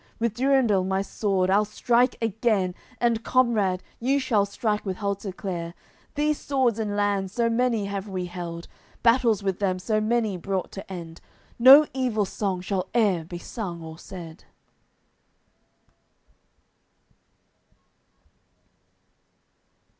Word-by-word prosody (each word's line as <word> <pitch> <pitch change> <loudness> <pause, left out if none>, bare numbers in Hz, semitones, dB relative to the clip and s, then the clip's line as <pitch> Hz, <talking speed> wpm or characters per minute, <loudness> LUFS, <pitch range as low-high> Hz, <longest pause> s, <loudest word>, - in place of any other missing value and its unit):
With 230 -2 -1
Durendal 245 -6 +2
my 190 +1 0
sword 190 -2 0
I'll 205 +2 +4
strike 240 +4 +1
again, 215 -4 +1 0.3
And, 230 -2 +1
comrade, 215 -8 +2 0.2
you 270 +4 +1
shall 215 -6 +1
strike 210 +1 -2
with 190 -2 -4
Halteclere. 190 -4 -4 0.4
These 300 0 +1
swords 255 -5 0
in 210 -2 -2
lands 200 -2 0
so 230 0 +1
many 230 -3 +1
have 200 0 -4
we 185 -2 -3
held, 175 -1 -7 0.4
Battles 230 -3 +3
with 190 -2 -1
them 190 -3 0
so 215 +3 0
many 220 -3 0
brought 190 +1 -3
to 195 0 -9
end, 170 -3 -8 0.4
No 270 +5 +9
evil 245 -6 0
song 190 -2 -3
shall 185 0 -2
e'er 195 -7 +2
be 175 +1 -7
sung 175 -3 -6
or 160 0 -9
said." 170 -4 -10
205 Hz, 120 wpm, -25 LUFS, 185-235 Hz, 0.4 s, No